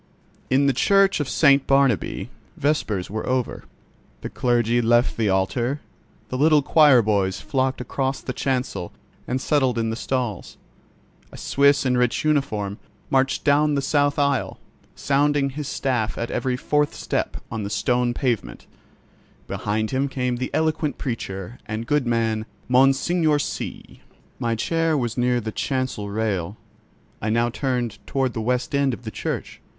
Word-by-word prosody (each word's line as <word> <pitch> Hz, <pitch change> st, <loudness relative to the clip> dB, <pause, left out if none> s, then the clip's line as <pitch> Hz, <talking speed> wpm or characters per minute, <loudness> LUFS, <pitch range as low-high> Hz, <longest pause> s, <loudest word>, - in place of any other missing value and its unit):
In 135 Hz, +2 st, +3 dB
the 140 Hz, -, +3 dB
Church 195 Hz, +8 st, +3 dB
of 145 Hz, -3 st, -2 dB
St. 140 Hz, -3 st, +4 dB
Barnabķ 135 Hz, -5 st, +1 dB, 0.3 s
vespers 110 Hz, -11 st, -1 dB
were 110 Hz, +1 st, -4 dB
over; 130 Hz, -1 st, -2 dB, 0.6 s
the -, -, -6 dB
clergy 120 Hz, -1 st, +1 dB
left 120 Hz, +1 st, +3 dB
the 110 Hz, -3 st, +1 dB
altar; 115 Hz, +9 st, 0 dB, 0.5 s
the 130 Hz, -, -3 dB
little 150 Hz, -1 st, +5 dB
choir 145 Hz, -5 st, +6 dB
boys 100 Hz, -3 st, 0 dB
flocked 130 Hz, -1 st, -1 dB
across 135 Hz, +2 st, -2 dB
the 130 Hz, -, -5 dB
chancel 130 Hz, -10 st, -2 dB, 0.4 s
and 130 Hz, +2 st, -1 dB
settled 130 Hz, -4 st, +1 dB
in 115 Hz, -1 st, 0 dB
the -, -, -2 dB
stalls. 120 Hz, -5 st, -3 dB, 0.7 s
A -, -, -11 dB
Suisse 140 Hz, 0 st, +3 dB
in 125 Hz, -1 st, +2 dB
rich 125 Hz, +4 st, +1 dB
uniform 110 Hz, -10 st, 0 dB, 0.3 s
marched 135 Hz, 0 st, +2 dB
down 150 Hz, +1 st, +3 dB
the 140 Hz, -, +1 dB
south 145 Hz, 0 st, +1 dB
aisle, 140 Hz, -3 st, 0 dB, 0.4 s
sounding 140 Hz, 0 st, +1 dB
his 150 Hz, +1 st, -5 dB
staff 120 Hz, -7 st, -1 dB
at 115 Hz, -, -3 dB
every 130 Hz, -2 st, -1 dB
fourth 150 Hz, +1 st, 0 dB
step -, -, -2 dB
on 110 Hz, -, -3 dB
the 100 Hz, -, -4 dB
stone 120 Hz, +1 st, 0 dB
pavement; 115 Hz, -, -2 dB, 0.8 s
behind 110 Hz, +1 st, -2 dB
him 135 Hz, +1 st, 0 dB
came 125 Hz, -2 st, -1 dB
that 130 Hz, +1 st, -3 dB
eloquent 155 Hz, -1 st, 0 dB
preacher 110 Hz, -3 st, -5 dB
and 110 Hz, +1 st, -4 dB
good 145 Hz, 0 st, +1 dB
man, 115 Hz, -2 st, 0 dB, 0.2 s
Monseigneur 140 Hz, +5 st, +3 dB
C——. 145 Hz, -, -5 dB, 0.4 s
My 115 Hz, -1 st, 0 dB
chair 165 Hz, +6 st, 0 dB
was 120 Hz, -4 st, -2 dB
near 125 Hz, 0 st, +1 dB
the 110 Hz, -1 st, -4 dB
chancel 130 Hz, -5 st, -2 dB
rail, 100 Hz, -3 st, -2 dB, 0.6 s
I 110 Hz, -, -1 dB
now 115 Hz, +2 st, +1 dB
turned 125 Hz, -4 st, -2 dB
toward 130 Hz, -3 st, 0 dB
the 110 Hz, -, -3 dB
west 125 Hz, +4 st, -1 dB
end 140 Hz, -3 st, +2 dB
of 120 Hz, -, -17 dB
the 110 Hz, -, -6 dB
church. -, -, -5 dB
125 Hz, 155 wpm, -23 LUFS, 115-140 Hz, 0.8 s, choir